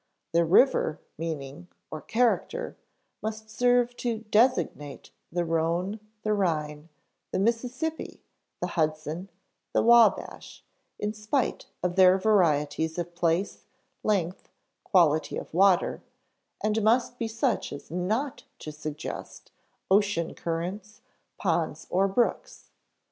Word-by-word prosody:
The 170 Hz, +1 st, +3 dB
river 170 Hz, -, +4 dB, 0.2 s
meaning 155 Hz, 0 st, -6 dB, 0.2 s
(or 155 Hz, -, -5 dB
character) 235 Hz, +1 st, 0 dB, 0.5 s
must 220 Hz, 0 st, -5 dB
serve 245 Hz, 0 st, +2 dB
to 230 Hz, -3 st, -2 dB
designate 210 Hz, -, +1 dB, 0.2 s
the 175 Hz, +1 st, -1 dB
Rhone, 170 Hz, +5 st, 0 dB, 0.2 s
the 215 Hz, -, +1 dB
Rhine, 155 Hz, -5 st, -1 dB, 0.4 s
the -, -, -2 dB
Mississippi, 250 Hz, -, -2 dB, 0.4 s
the 180 Hz, -, -1 dB
Hudson, 155 Hz, +2 st, -2 dB, 0.4 s
the -, -, +3 dB
Wabash, 235 Hz, 0 st, +3 dB, 0.3 s
in 210 Hz, +1 st, -2 dB
spite 215 Hz, +5 st, -1 dB, 0.2 s
of 180 Hz, 0 st, -1 dB
their 185 Hz, 0 st, +7 dB
varieties 160 Hz, -6 st, +2 dB
of 175 Hz, 0 st, -4 dB
place, 170 Hz, +2 st, -1 dB, 0.3 s
length, 185 Hz, -4 st, -1 dB, 0.3 s
quality 160 Hz, -5 st, +3 dB
of -, -, -8 dB
water; 185 Hz, +1 st, +3 dB, 0.6 s
and 215 Hz, +1 st, +1 dB
must 240 Hz, +3 st, +2 dB
be 230 Hz, -, -1 dB
such 230 Hz, +1 st, -1 dB
as 140 Hz, +1 st, -9 dB
not 215 Hz, -, -2 dB
to 155 Hz, -, -7 dB
suggest 150 Hz, 0 st, -7 dB, 0.4 s
ocean 200 Hz, -4 st, +2 dB
currents, 185 Hz, +7 st, -5 dB, 0.4 s
ponds, 165 Hz, -4 st, -1 dB
or 190 Hz, +2 st, +3 dB
brooks. 215 Hz, +5 st, -1 dB
185 Hz, 110 wpm, -27 LUFS, 165-220 Hz, 0.6 s, their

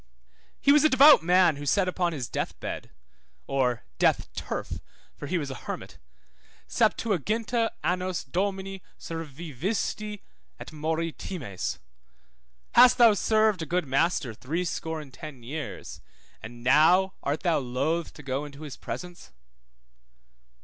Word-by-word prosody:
He 280 Hz, -, +4 dB
was 295 Hz, +1 st, +6 dB
a 310 Hz, -, +6 dB
devout 285 Hz, +3 st, +8 dB
man 175 Hz, -2 st, +4 dB
who 145 Hz, -, -6 dB
said 195 Hz, +4 st, +3 dB
upon 180 Hz, -1 st, 0 dB
his 135 Hz, -7 st, -4 dB
death -, -, -4 dB
bed, -, -, -5 dB, 0.6 s
or 125 Hz, -4 st, 0 dB, 0.2 s
death -, -, +2 dB
turf -, -, -4 dB, 0.4 s
(for 145 Hz, -, -7 dB
he 180 Hz, -, 0 dB
was 145 Hz, -4 st, -3 dB
a 130 Hz, -, -8 dB
hermit), -, -, -6 dB, 0.7 s
Septuaginta 225 Hz, -, +1 dB
annos 180 Hz, 0 st, -1 dB
Domino 195 Hz, +4 st, -2 dB, 0.2 s
servivisti, 170 Hz, -, -4 dB, 0.4 s
et -, -, -9 dB
mori 160 Hz, +2 st, -2 dB
times? 125 Hz, -, -5 dB, 0.9 s
Hast 245 Hz, +1 st, +7 dB
thou 235 Hz, -3 st, +7 dB
served 215 Hz, -2 st, +2 dB
a 160 Hz, -, -4 dB
good 175 Hz, +2 st, 0 dB
master 135 Hz, -2 st, +1 dB
threescore 160 Hz, +5 st, -3 dB
and 135 Hz, -3 st, -13 dB
ten 140 Hz, -4 st, -10 dB
years, 145 Hz, +5 st, -6 dB, 0.4 s
and 120 Hz, +2 st, -10 dB
now 175 Hz, +9 st, +5 dB
art 145 Hz, +4 st, -2 dB
thou 170 Hz, -4 st, +2 dB
loth 140 Hz, +6 st, -1 dB
to 150 Hz, -, -11 dB
go 135 Hz, +1 st, -2 dB
into 145 Hz, +1 st, -10 dB
his 145 Hz, -4 st, -8 dB
presence? 175 Hz, +9 st, -8 dB
165 Hz, 135 wpm, -27 LUFS, 140-190 Hz, 0.9 s, devout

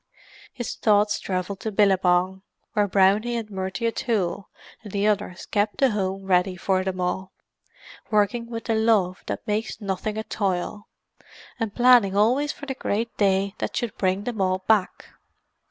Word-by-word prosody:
His 240 Hz, -3 st, -5 dB
thoughts 210 Hz, -1 st, +2 dB
travelled 185 Hz, +1 st, -3 dB
to 220 Hz, -, -4 dB
Billabong, 190 Hz, -2 st, +2 dB, 0.3 s
where 210 Hz, -2 st, +2 dB
Brownie 200 Hz, +5 st, +3 dB
and 225 Hz, -2 st, -4 dB
Murty 190 Hz, +4 st, -3 dB
O'Toole 215 Hz, -5 st, -1 dB, 0.3 s
and 210 Hz, -, -10 dB
the 200 Hz, +1 st, 0 dB
others 205 Hz, -3 st, -1 dB
kept 205 Hz, 0 st, 0 dB
the 270 Hz, -2 st, +3 dB
home 195 Hz, -1 st, -2 dB
ready 185 Hz, 0 st, +2 dB
for 185 Hz, +1 st, 0 dB
them 190 Hz, -1 st, -3 dB
all, 180 Hz, +1 st, -2 dB, 0.8 s
working 230 Hz, +2 st, +1 dB
with 230 Hz, -1 st, -5 dB
the 225 Hz, -, -1 dB
love 220 Hz, -5 st, +2 dB
that -, -, -4 dB
makes 215 Hz, +1 st, -2 dB
nothing 205 Hz, +1 st, -3 dB
a 220 Hz, -, -2 dB
toil, 200 Hz, 0 st, -2 dB, 0.7 s
and 225 Hz, -3 st, -3 dB
planning 240 Hz, -6 st, +5 dB
always 255 Hz, +8 st, +3 dB
for 285 Hz, -, -10 dB
the 270 Hz, -, -3 dB
great 230 Hz, -2 st, -2 dB
day 195 Hz, -1 st, +2 dB
that -, -, -3 dB
should 240 Hz, -4 st, -2 dB
bring 190 Hz, +1 st, 0 dB
them 220 Hz, -3 st, -3 dB
all 185 Hz, 0 st, 0 dB
back. 210 Hz, -4 st, +2 dB
205 Hz, 160 wpm, -24 LUFS, 190-225 Hz, 0.8 s, planning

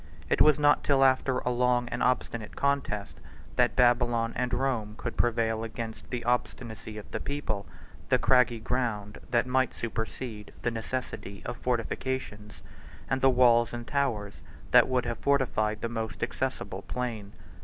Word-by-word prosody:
It -, -, +3 dB
was 150 Hz, -1 st, +6 dB
not 145 Hz, 0 st, +4 dB
till 135 Hz, -2 st, +4 dB
after 130 Hz, 0 st, +3 dB
a 125 Hz, -, -1 dB
long 125 Hz, 0 st, +2 dB
and 120 Hz, -, -4 dB
obstinate 120 Hz, -3 st, 0 dB
contest 140 Hz, -8 st, -1 dB, 0.4 s
that -, -, +3 dB
Babylon 120 Hz, -2 st, +3 dB
and 125 Hz, 0 st, -1 dB
Rome 115 Hz, -6 st, -1 dB
could 120 Hz, -, -5 dB
prevail 115 Hz, -1 st, +1 dB
against 110 Hz, 0 st, -6 dB
the 125 Hz, -2 st, -3 dB
obstinacy 115 Hz, -3 st, -2 dB
of 105 Hz, -, -10 dB
the 110 Hz, -, -2 dB
people, 110 Hz, -9 st, -3 dB, 0.4 s
the -, -, +5 dB
craggy 125 Hz, -3 st, +3 dB
ground 110 Hz, -4 st, -2 dB
that 120 Hz, 0 st, +2 dB
might 130 Hz, 0 st, +1 dB
supersede 110 Hz, -1 st, -5 dB
the 120 Hz, -, +1 dB
necessity 110 Hz, -4 st, -5 dB
of -, -, -3 dB
fortifications, 120 Hz, -3 st, -3 dB, 0.5 s
and 135 Hz, 0 st, +1 dB
the 135 Hz, -, +6 dB
walls 120 Hz, -2 st, +4 dB
and 120 Hz, 0 st, -5 dB
towers 115 Hz, -8 st, -1 dB, 0.3 s
that -, -, +7 dB
would 130 Hz, -1 st, 0 dB
have 120 Hz, -3 st, -3 dB
fortified 110 Hz, -4 st, +1 dB
the -, -, -1 dB
most 110 Hz, -4 st, -4 dB
accessible -, -, -3 dB
plain. 115 Hz, -5 st, -4 dB
120 Hz, 155 wpm, -28 LUFS, 110-130 Hz, 0.5 s, that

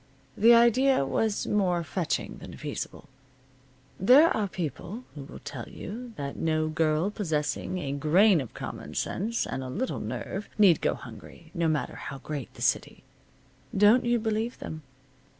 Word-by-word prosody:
The 230 Hz, +3 st, +7 dB
idea 240 Hz, -, +4 dB
was 215 Hz, +8 st, 0 dB
more 180 Hz, -4 st, +1 dB
fetching 165 Hz, +1 st, -2 dB
than -, -, -10 dB
feasible. -, -, -6 dB, 0.9 s
There 265 Hz, -, +6 dB
are 210 Hz, -2 st, 0 dB
people 180 Hz, -, -5 dB
who 145 Hz, -3 st, -8 dB
will -, -, -10 dB
tell 135 Hz, -4 st, -6 dB
you 235 Hz, +5 st, -8 dB
that 140 Hz, -1 st, -5 dB
no 155 Hz, -1 st, 0 dB
girl 155 Hz, +4 st, +1 dB
possessing 160 Hz, -, -2 dB
a 140 Hz, -6 st, -3 dB
grain 160 Hz, +6 st, +4 dB
of 125 Hz, -, -9 dB
common -, -, -7 dB
sense 225 Hz, +5 st, -1 dB
and 130 Hz, -, -4 dB
a 130 Hz, -, -6 dB
little 245 Hz, -, -2 dB
nerve 200 Hz, +2 st, -5 dB
need 195 Hz, -7 st, +6 dB
go -, -, +1 dB
hungry, 140 Hz, +6 st, -12 dB
no 170 Hz, -1 st, 0 dB
matter 155 Hz, -2 st, -1 dB
how 140 Hz, -, -6 dB
great 140 Hz, -1 st, -6 dB
the -, -, -6 dB
city. -, -, 0 dB, 0.7 s
Don't 210 Hz, +5 st, +6 dB
you 240 Hz, 0 st, +2 dB
believe 220 Hz, +1 st, -2 dB
them. 155 Hz, 0 st, -7 dB
180 Hz, 155 wpm, -28 LUFS, 150-220 Hz, 0.9 s, The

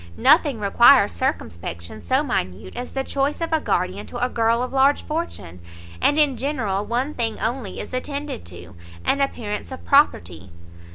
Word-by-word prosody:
Nothing 290 Hz, -3 st, +4 dB
requires 210 Hz, -, +5 dB
circumspection 85 Hz, +3 st, -4 dB
so 265 Hz, +3 st, +1 dB
minute 95 Hz, -, -3 dB
as 250 Hz, -, -6 dB
the 270 Hz, -, -1 dB
choice 275 Hz, +2 st, -1 dB
of 330 Hz, -1 st, -3 dB
a 320 Hz, -, +3 dB
guardian 185 Hz, -3 st, -1 dB
to 245 Hz, -, -7 dB
a 250 Hz, +1 st, 0 dB
girl 230 Hz, +1 st, +1 dB
of 255 Hz, -, -5 dB
large 275 Hz, +2 st, +3 dB
fortune, 300 Hz, -, -5 dB, 0.4 s
and 290 Hz, -, +3 dB
in 290 Hz, -4 st, +3 dB
general 225 Hz, -9 st, -2 dB
one 250 Hz, +7 st, -2 dB
thing 230 Hz, -4 st, -2 dB
only 225 Hz, -4 st, -3 dB
is -, -, -7 dB
attended 280 Hz, -, -4 dB
to, 85 Hz, 0 st, -11 dB, 0.3 s
an 280 Hz, -, +2 dB
appearance 220 Hz, -5 st, -3 dB
of 260 Hz, -, -9 dB
property. 90 Hz, -, +2 dB
245 Hz, 165 wpm, -22 LUFS, 185-280 Hz, 0.4 s, requires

